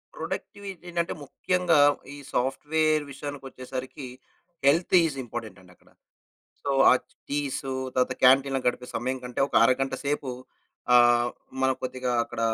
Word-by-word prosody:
Productivity 195 -3 -6
ఏంటంటే 170 0 -1
ముఖ్యంగా 175 +3 +1 0.4
ఈ - - -10 0.2
సాఫ్ట్‌వేర్ 155 +4 +1
విషయానికి 145 0 -7
వచ్చేసరికి 130 +1 -7 0.6
హెల్త్ 165 +6 +4
ఈస్ 155 -4 -1
ఇంపార్టెంట్ 115 -4 -7
అండి 90 -1 -18
అక్కడ. - - -26 0.7
సో, 140 - -2 0.2
ఆ - - +7 0.4
టీసు 140 -2 -2 0.2
తరువాత 130 0 +2
క్యాంటీన్ 135 +1 +5
గడిపే 125 0 0
సమయం 130 +2 -2
కంటే 125 -1 -4
ఒక - - -12
అరగంట 135 +2 +2
సేపు 140 -1 -1 0.6
ఆహ్, 120 0 +5 0.3
మనం 130 0 +3
కొద్దిగా 130 0 -3
అక్కడ 120 -1 -7
135 Hz, 130 wpm, -26 LUFS, 125-150 Hz, 0.7 s, ఆ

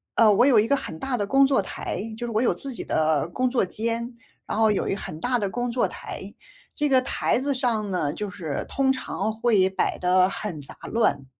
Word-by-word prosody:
呃， 220 -2 +6
我 240 - +5
有 260 -6 +6
一 215 - +2
个 280 - +3
很 160 -11 -6
大 265 -2 -2
的 205 - -1
工 270 +5 +4
作 270 -6 +3
台， 190 - -5 0.2
就 240 +1 -4
是 - - -4
我 215 - +2
有 250 - +3
自 275 -1 -6
己 - - -5
的 155 0 +1
工 255 +7 0
作 245 -6 +1
间， 230 +4 -3 0.3
然 - - -3
后 220 0 +4
有 205 - -1
一 - - 0
很 155 -5 -6
大 245 +3 +1
的 200 -3 -1
工 245 +4 -2
作 245 - +1
台， - - -8 0.4
这 295 -1 0
个 260 -1 +5
台 255 - 0
子 280 +2 0
上 230 -5 0
呢， 150 -6 0
就 210 +5 -4
是 160 -7 -4
通 270 -1 +1
常 220 -5 -2
会 220 -4 +3
摆 190 0 -1
得 185 +1 +4
很 190 -7 -5
杂 140 - -10 0.2
乱。 145 -12 +1
225 Hz, 245 characters per minute, -25 LUFS, 190-250 Hz, 0.4 s, 呃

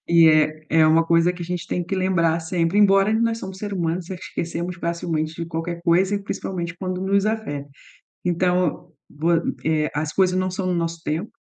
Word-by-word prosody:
É 160 -2 +6
é 155 +1 -1
é 155 - +6
uma 160 +1 +4
coisa 170 +1 +3
que 175 - -8
a - - -4
gente 180 0 -4
tem 175 - -2
que 195 - -3
lembrar 170 -3 +1
sempre, 165 +3 0
embora 195 0 +5
nós 230 0 +1
somos 190 -2 -7
ser 205 0 -5
humano, 170 -2 -1
esquecemos 175 0 -5
facilmente 165 -2 -2
de 170 0 -5
qualquer 170 +1 -4
coisa 185 +3 +3
e 200 - -2
principalmente 170 -3 -4
quando 185 0 -4
nos 200 +1 +1
afeta. 180 -11 -3 0.6
Então, 180 -1 0 0.2
vo 160 +4 -1 0.3
eh, 155 -1 +1
as 150 +1 -2
coisas 185 -1 +2
não 185 0 0
são 185 +1 -3
no 180 - +1
nosso 165 -1 -2
tempo, 160 +8 -2
175 Hz, 195 wpm, -22 LUFS, 165-185 Hz, 0.6 s, É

